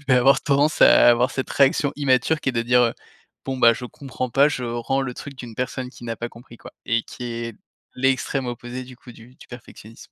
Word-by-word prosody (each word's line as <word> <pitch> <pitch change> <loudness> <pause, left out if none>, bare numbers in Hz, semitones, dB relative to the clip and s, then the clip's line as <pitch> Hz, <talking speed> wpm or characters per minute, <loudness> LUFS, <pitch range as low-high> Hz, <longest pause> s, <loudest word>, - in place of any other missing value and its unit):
je - - -21
vais 130 - +5
avoir 135 +2 +4
tendance 145 +2 +2
à - - +7
avoir 120 +2 +3
cette 130 - -4
réaction 140 +1 +2
immature 140 +2 +1
qui - - -2
est - - -11
de 115 -1 -1
dire, 125 +1 +3
heu: 115 -1 +2 0.5
«Bon 135 -1 -3
beh, 115 -2 +6
je 125 - -8
comprends 130 -1 -6
pas, 140 +4 +4
je 130 -4 -4
rends 120 +3 -2
le 125 -2 -4
truc 140 -1 -9
d'une 120 -3 -9
personne 125 +1 -4
qui 120 - -14
n'a 115 -1 -4
pas 120 +2 -5
compris, 120 0 -15
quoi - - -13
et 115 -2 0
qui 125 - -10
est 115 -2 -5 0.4
l'extrême 135 0 0
opposé 120 +1 -6
du 125 -1 -13
coup 120 - -14
du 120 +3 -17
du - - -16
perfectionnisme». 115 -2 -13
125 Hz, 235 wpm, -22 LUFS, 120-135 Hz, 0.5 s, à